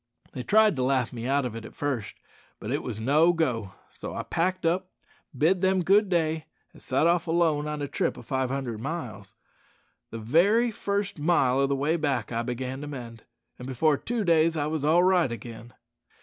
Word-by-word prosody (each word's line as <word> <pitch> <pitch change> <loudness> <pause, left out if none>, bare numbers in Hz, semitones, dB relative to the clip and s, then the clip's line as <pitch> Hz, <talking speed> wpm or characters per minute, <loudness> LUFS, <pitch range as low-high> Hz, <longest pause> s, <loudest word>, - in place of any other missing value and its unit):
They 130 - -6
tried 215 - +4
to 130 - 0
laugh 130 -2 0
me 120 0 -5
out 140 0 +1
of 120 -3 -4
it 115 - -7
at - - -11
first, 130 -7 -3 0.4
but 110 - -6
it 145 - -1
was 110 -4 -6
no 150 +9 +4
go, 115 - -1 0.2
so - - -7
I - - -3
packed 180 +1 -1
up, 180 +3 0 0.5
bid 170 +6 +2
them 190 -1 +2
good 200 +3 +4
day, 160 -4 0 0.3
an' - - -16
sot 135 +4 0
off 170 0 +2
alone 160 -3 +1
on 150 -1 -3
a - - -2
trip - - -1
o' - - -10
five 130 +2 -1
hundred 130 -5 -3
miles. 125 - -6 0.7
The 115 - -7
very 190 - +3
first 200 -4 -3
mile 140 -5 +2
o' 140 - +3
the 140 - 0
way 150 +5 0
back 135 -9 -1
I 115 0 -1
began 130 +2 -4
to 145 - -6
mend, 120 -5 -8 0.3
and 125 - -7
before 145 +4 +2
two 230 - -3
days 165 -2 +3
I 145 - 0
wos 155 -1 -2
all 165 +4 +4
right 180 -7 +3
again." 115 +1 -8
145 Hz, 205 wpm, -26 LUFS, 125-170 Hz, 0.7 s, tried